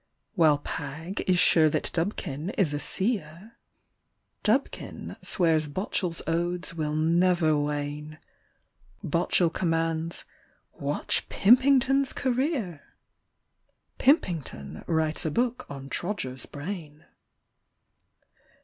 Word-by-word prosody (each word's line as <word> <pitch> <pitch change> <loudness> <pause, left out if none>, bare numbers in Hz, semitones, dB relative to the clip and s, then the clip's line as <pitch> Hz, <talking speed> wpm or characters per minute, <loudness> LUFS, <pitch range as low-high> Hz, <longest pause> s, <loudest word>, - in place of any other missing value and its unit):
While 160 -7 +4
Pagg 150 +6 -5
is 185 -1 +4
sure 160 -3 +5
that - - 0
Dubkin 165 -1 -3
is 165 -8 +2
a 145 - -1
seer, 190 +1 -2 0.9
Dubkin 245 +6 -1
swears 160 -4 +2
Botchell's 175 +1 -2
odes 175 +1 -1
will 155 -2 -2
never 165 0 +3
wane; 145 +1 -3 0.9
Botchell 170 +1 +2
commands: 165 -1 -1 0.3
" - - -42 0.2
Watch - - -1
Pimping 260 +5 +5
ton's 270 +1 +2
career! 250 - -1 0.6
" - - -46
Pimpington 155 - 0
writes 160 -2 0
a 160 - 0
book 245 +7 -1
on 135 -1 -7
Trodger's 135 - -3
brain. 155 -1 -7
165 Hz, 100 wpm, -27 LUFS, 150-195 Hz, 0.9 s, sure